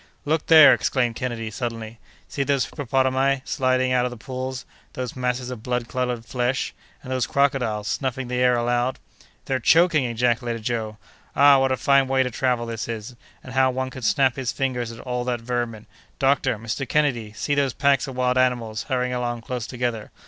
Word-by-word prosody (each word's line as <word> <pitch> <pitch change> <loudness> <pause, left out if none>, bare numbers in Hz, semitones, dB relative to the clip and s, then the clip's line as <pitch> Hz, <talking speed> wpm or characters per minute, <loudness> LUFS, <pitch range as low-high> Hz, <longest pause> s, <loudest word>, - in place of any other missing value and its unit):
"Look 155 +1 0
there!" 160 -3 +9
exclaimed 125 -3 0
Kennedy, 115 -3 -4
suddenly, 115 -1 -5 0.3
"see 140 - -2
those 140 -1 +1
hippopotami 135 0 0
sliding 130 0 +1
out 125 -1 +3
of 125 - 0
the 125 - -9
pools—those 130 0 -7
masses 125 0 -2
of 120 -4 -7
blood 125 0 -2
colored 125 -2 -2
flesh—and 125 +1 -4
those 130 -2 0
crocodiles 125 -7 0
snuffing 130 -1 -2
the 125 0 -3
air 125 -1 +4
aloud!" 120 +2 0 0.5
"They're 130 -1 -1
choking!" 165 +3 +4
ejaculated 120 -1 -1
Joe. 110 -2 -3 0.4
"Ah! 140 0 +7
what 135 0 +2
a 130 - +1
fine 140 0 +3
way 135 0 +2
to 125 - -3
travel 125 -1 0
this 115 -1 -5
is; 115 +1 -6 0.3
and 130 - -10
how 130 0 +4
one 130 0 -3
can 130 - -9
snap 130 +2 +2
his 130 -2 -2
fingers 125 -3 -2
at 115 - -11
all 125 -1 -3
that 120 -2 -2
vermin!—Doctor! 120 +2 -2
Mr. 115 +4 -4
Kennedy! 125 -8 +1
see 145 - -2
those 140 -3 +1
packs 140 0 +2
of 135 - -7
wild 125 0 +1
animals 120 -4 0
hurrying 125 -1 0
along 120 -1 -2
close 120 -1 -5
together. 120 -3 -3
125 Hz, 180 wpm, -23 LUFS, 120-130 Hz, 0.5 s, there